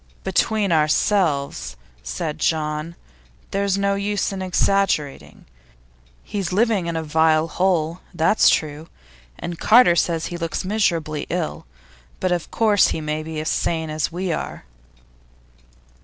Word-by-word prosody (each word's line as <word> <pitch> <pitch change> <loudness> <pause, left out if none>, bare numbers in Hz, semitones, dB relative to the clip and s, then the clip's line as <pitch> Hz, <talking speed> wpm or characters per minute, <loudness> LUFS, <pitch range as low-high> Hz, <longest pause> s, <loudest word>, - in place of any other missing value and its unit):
'Between 200 +1 +1
ourselves,' 150 - +1 0.3
said 155 - -4
John, 155 +1 -1 0.6
'there's 200 0 0
no 200 0 +1
use 200 +1 -1
in 195 -1 -5
exaggerating. 180 - 0 0.8
He's 195 -4 -4
living 205 -2 +1
in 170 - -2
a 160 - -2
vile 160 +1 +2
hole, 170 -2 0
that's 170 +5 +4
true, 155 +1 -1 0.5
and 170 -1 -6
Carter 225 -6 +6
says 165 -1 0
he 175 - -5
looks 165 +1 -3
miserably 170 -7 -1
ill, 170 -2 -3 0.5
but 185 - 0
of 175 -2 -1
course 210 -4 +3
he - - -2
may 155 0 -3
be 160 0 -5
as 155 - -2
sane 160 -2 -1
as 155 +1 -1
we 180 +1 -3
are. - - -5
170 Hz, 130 wpm, -22 LUFS, 155-195 Hz, 0.8 s, Carter